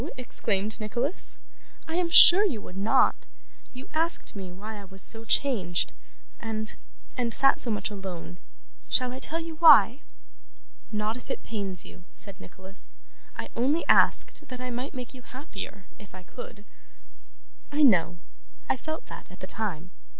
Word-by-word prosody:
exclaimed 215 -4 -3
Nicholas. 240 - -2 0.5
'I 320 - -6
am 350 -1 0
sure 360 +3 +9
you 330 - -1
would 180 - -12
not. 200 +3 +1 0.4
You 255 +1 -11
asked 325 -6 -1
me 190 -3 -7
why 210 +4 -9
I - - -12
was 190 0 +1
so 225 0 +2
changed, 205 -9 0 0.5
and 220 -1 -5 0.4
and 240 -2 -2
sat 275 +4 +7
so 245 - 0
much 215 -1 -2
alone. 185 -3 -8 0.5
Shall 250 -1 +1
I 260 - -7
tell 325 +4 0
you 325 -1 -8
why?' 285 -6 +7 0.9
'Not 215 +2 -2
if - - -14
it - - -5
pains 200 -5 -5
you,' 180 - -15
said 200 -1 -7
Nicholas. 190 +2 -14 0.4
'I - - -6
only 275 +8 0
asked - - +5
that 255 -1 -9
I 255 0 -6
might 250 +4 -6
make 250 0 -8
you 255 - -13
happier, 215 -7 -10
if 200 -3 -15
I 185 - -12
could.' 215 +1 -12 1.1
'I 295 +1 +1
know. 175 - +3 0.5
I - - 0
felt 315 +4 -7
that, - - -12
at - - -15
the - - -6
time. 185 -5 -5
225 Hz, 160 wpm, -26 LUFS, 195-265 Hz, 1.1 s, sure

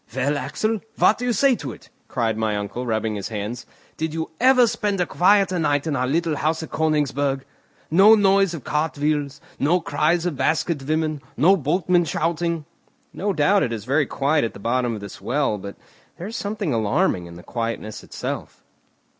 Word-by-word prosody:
"Well, 135 +2 +1
Axel, 205 +11 -1 0.2
what 215 - +4
do 245 - -3
you 245 - +1
say 260 +4 +3
to 140 -7 -6
it?" - - -17 0.2
cried 115 -2 -1
my 110 -1 -1
uncle, 110 +5 -4
rubbing 110 -1 -1
his 100 -2 -4
hands. 110 +2 -5 0.3
"Did 160 0 -3
you 160 0 -3
ever 255 0 +6
spend 205 -3 -1
a 180 - +2
quieter 185 0 +3
night 145 -2 +1
in 155 -3 -1
our 125 -1 0
little 160 +2 0
house 160 +2 0
at - - -9
Königsberg? 145 -3 0 0.5
No 195 +7 +7
noise 195 -3 +3
of 145 - -8
cart 150 +1 -1
wheels, 145 -1 -1 0.2
no 165 +6 +3
cries 160 +3 +1
of 175 -4 -1
basket 160 0 0
women, 155 +1 -1 0.2
no 175 +9 +5
boatmen 175 +2 +1
shouting!" 165 0 -1 0.5
"No 205 +2 -1
doubt 195 +4 +3
it 120 - 0
is 110 -3 -5
very 140 +2 +2
quiet 145 +2 +1
at 115 - -2
the - - -9
bottom 120 +2 0
of 105 - -8
this 100 -1 -9
well, 135 -6 0
but 100 +1 -8 0.4
there 175 - -7
is 220 +3 -6
something 200 - -2
alarming 100 -5 +1
in 85 - -11
the 90 - -11
quietness 115 -2 -4
itself." - - -6
150 Hz, 190 wpm, -22 LUFS, 125-175 Hz, 0.5 s, No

